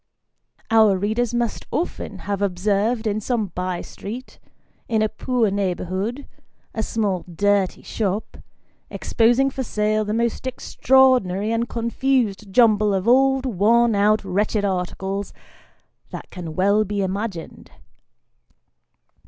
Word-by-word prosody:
Our 220 -3 +5
readers 220 +5 0
must 240 -1 -2
often 335 - -4
have 200 -1 -2
observed 205 +4 0
in 215 0 -1
some 220 -3 -1
by 180 -1 -3
street, 240 +6 -9 0.5
in 220 -1 +2
a - - +3
poor 225 0 0
neighbourhood, 195 +6 -2 0.5
a 220 - -2
small 205 -5 -1
dirty 200 +1 +1
shop, 205 -1 -3 0.5
exposing 240 +4 +2
for 265 - -4
sale 215 -2 0
the 210 - -4
most 235 +2 -1
extraordinary 250 -6 +2
and 230 +1 -1
confused 235 -3 -1
jumble 215 -2 +4
of 190 +3 -2
old, 265 +2 +4
worn 235 +1 +3
out, 210 +1 +2
wretched 205 +2 0
articles, 190 +1 -3 0.8
that - - -9
can 170 -4 -7
well 200 +4 +3
be 205 -1 -2
imagined. 190 -2 -5
215 Hz, 120 wpm, -22 LUFS, 195-235 Hz, 0.8 s, Our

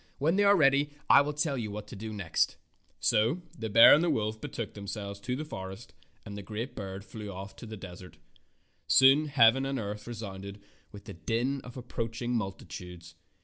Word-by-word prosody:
When 160 +6 +1
they 205 - +3
are 200 0 +6
ready 140 -1 +4 0.2
I - - +9
will 145 +1 -1
tell 150 -1 0
you 110 -2 -3
what 105 +1 -6
to - - -8
do 110 +2 -6
next." 100 -6 0 0.4
So 120 +12 +2
the 110 0 -5
bear 115 +3 +9
and 170 +3 +4
wolf 110 0 -2
betook 115 - -5
themselves 100 0 -6
to 125 +4 -3
the 155 +4 -4
forest, 95 -2 -8 0.3
and 100 -2 -7
the 100 - -6
great 110 +6 -6
bird 95 -1 -6
flew 105 -3 -8
off 95 +1 -8
to 115 - -9
the 110 0 -7
desert. 90 -1 -11 0.7
Soon 135 +3 +6
heaven 135 -2 +5
and 135 0 -2
earth 105 -1 -5
resounded 100 -3 -7 0.3
with 100 -1 -12
the - - -8
din 115 +11 -1
of 125 +1 -10
approaching 120 -1 -4
multitudes. 90 -5 -6
110 Hz, 190 wpm, -29 LUFS, 100-130 Hz, 0.7 s, I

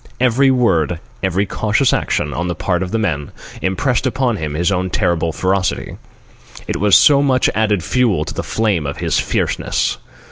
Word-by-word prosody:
Every 130 +2 +3
word, 90 - +1 0.2
every 95 +1 0
cautious 110 +6 +1
action, 75 -1 -1
on 85 - -2
the 85 - -2
part 90 +1 -1
of 95 - -3
the 115 - -1
men, 80 -10 -2 0.3
impressed 120 +8 0
upon 130 -3 0
him 75 -3 -4
his 85 +5 +1
own 95 -1 -1
terrible 85 -3 0
ferocity. 95 +3 -1 0.7
It - - -2
was 105 -1 +4
so 140 -2 +6
much 130 -3 +2
added 105 -4 +1
fuel 120 -1 +1
to - - -6
the - - -3
flame 100 -9 -1
of 70 - -5
his - - 0
fierceness. - - -1
100 Hz, 175 wpm, -17 LUFS, 85-120 Hz, 0.7 s, so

